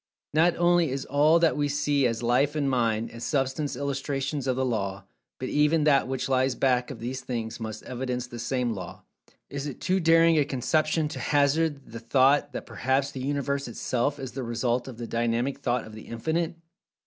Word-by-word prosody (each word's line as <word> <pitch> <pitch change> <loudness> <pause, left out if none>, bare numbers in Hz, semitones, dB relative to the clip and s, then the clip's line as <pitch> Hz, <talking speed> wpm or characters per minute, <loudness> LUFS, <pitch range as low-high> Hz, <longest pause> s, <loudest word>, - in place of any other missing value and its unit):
Not 165 +3 +4
only 175 -2 +3
is 135 +1 -3
all 150 +4 +4
that 165 -1 +3
we 145 0 +1
see 145 -2 +1
as 115 0 -3
Life 130 +5 +2
and 145 -2 0
Mind, 115 -4 0
and 115 - -10
Substance 140 +2 -1
illustrations 140 0 -2
of 130 - +1
the 130 +1 0
Law, 100 -5 -2 0.3
but 130 - -4
even 150 +2 +3
that 140 -3 +4
which 130 -1 -2
lies 130 -1 +2
back 125 -2 +1
of 130 - -7
these 125 +2 -4
things 115 -3 -4
must 110 -1 -6
evidence 125 0 -3
the 120 -1 -9
same 120 0 -1
Law. 95 - -8 0.5
Is 140 +1 -4
it 140 - -7
too 185 +2 +1
daring 165 -1 +5
a - - +4
conception 155 +4 +1
to - - -6
hazard 145 -1 +1
the 115 - -6
thought 130 +4 +3
that - - -6
perhaps 135 +2 0
the 130 - -6
Universe 140 0 -1
itself 125 +4 -1
is 130 -3 -6
the 135 +2 -5
result 120 +1 -1
of 125 -4 -8
the 120 - -5
Dynamic 120 +3 -1
Thought 120 -1 -1
of 110 - -11
The 110 - -11
Infinite? 160 +8 -2
135 Hz, 195 wpm, -27 LUFS, 120-145 Hz, 0.5 s, daring